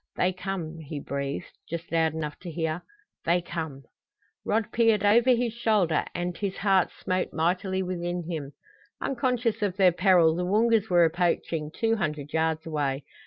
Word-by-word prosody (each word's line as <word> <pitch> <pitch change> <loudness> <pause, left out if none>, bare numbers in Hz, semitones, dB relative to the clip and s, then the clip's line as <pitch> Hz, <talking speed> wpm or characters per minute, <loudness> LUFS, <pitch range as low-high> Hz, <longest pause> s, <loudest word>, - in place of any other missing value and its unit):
"They 185 +1 +1
come," 180 -3 -5
he 150 -1 -6
breathed, 140 0 -5
just 170 0 -5
loud 160 -1 +2
enough 150 -2 -4
to 180 - -8
hear. 160 +1 -2 0.4
"They 170 +2 +3
come!" 160 -5 -5 0.6
Rod 220 0 0
peered 225 -3 +3
over 235 +5 +5
his 240 -2 +2
shoulder, 210 -9 +2
and 175 0 -2
his 195 0 -3
heart 195 -3 +3
smote 185 0 -2
mightily 185 +3 0
within 175 -1 -3
him. 150 -5 -5 0.5
Unconscious 250 -4 0
of 200 -2 -1
their 185 -2 +6
peril 175 -3 +4
the 180 - -1
Woongas 220 +3 +2
were 175 -2 +5
approaching 165 -2 0
two 225 +5 0
hundred 150 -5 -3
yards 160 0 0
away. 145 -3 -1
175 Hz, 160 wpm, -27 LUFS, 160-205 Hz, 0.6 s, their